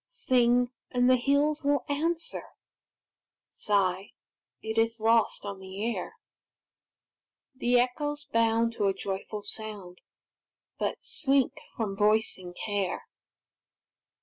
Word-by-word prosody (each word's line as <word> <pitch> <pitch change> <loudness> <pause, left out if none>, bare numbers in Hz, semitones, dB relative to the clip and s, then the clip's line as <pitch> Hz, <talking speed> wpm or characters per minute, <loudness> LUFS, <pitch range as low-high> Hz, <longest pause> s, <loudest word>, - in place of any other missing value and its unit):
Sing, 245 - +2 0.2
and 245 0 +2
the 255 - +7
hills 285 +4 +2
will 285 -2 +2
answer; 325 +4 -1 1.1
Sigh, 195 -2 0 0.5
it 220 +1 -2
is 230 0 +1
lost 225 -1 +2
on 200 -1 -5
the 195 +5 -3
air; 195 - -6 1.4
The 245 -1 +3
echoes 290 +4 -1
bound 230 0 +2
to 205 -3 +1
a 195 - +1
joyful 200 +2 -4
sound, 205 -4 -7 0.8
But - - -2
shrink 275 -3 +1 0.2
from 210 -4 -2
voicing 205 -4 +1
care. 200 -3 -2
230 Hz, 105 wpm, -29 LUFS, 205-255 Hz, 1.4 s, the